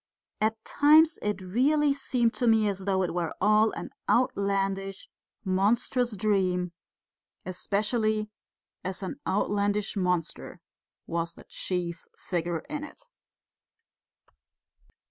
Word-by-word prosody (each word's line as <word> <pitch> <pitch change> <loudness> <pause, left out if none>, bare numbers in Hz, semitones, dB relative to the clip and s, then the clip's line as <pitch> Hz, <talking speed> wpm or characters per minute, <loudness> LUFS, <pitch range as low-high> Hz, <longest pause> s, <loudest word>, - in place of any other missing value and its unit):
At 220 +1 -1
times 310 +2 +5
it 210 -2 -2
really 280 +10 +2
seemed 250 -4 0
to 245 - 0
me 220 -2 +4
as 195 -2 -3
though 190 -1 +2
it 180 - -2
were 170 -2 -2
all 215 +1 +4
an - - -6 0.2
outlandish, 195 -5 0 0.4
monstrous 220 +5 +1
dream, 185 -3 +1 0.7
especially 215 +3 -1 0.5
as 190 +1 -4
an 230 +9 -5
outlandish 205 +1 0
monster 180 -4 -2 0.5
was 170 0 -3
the - - -13
chief 175 -2 -3
figure 170 -2 -2
in 300 -1 -6
it. 300 - -12
205 Hz, 105 wpm, -28 LUFS, 185-230 Hz, 0.7 s, times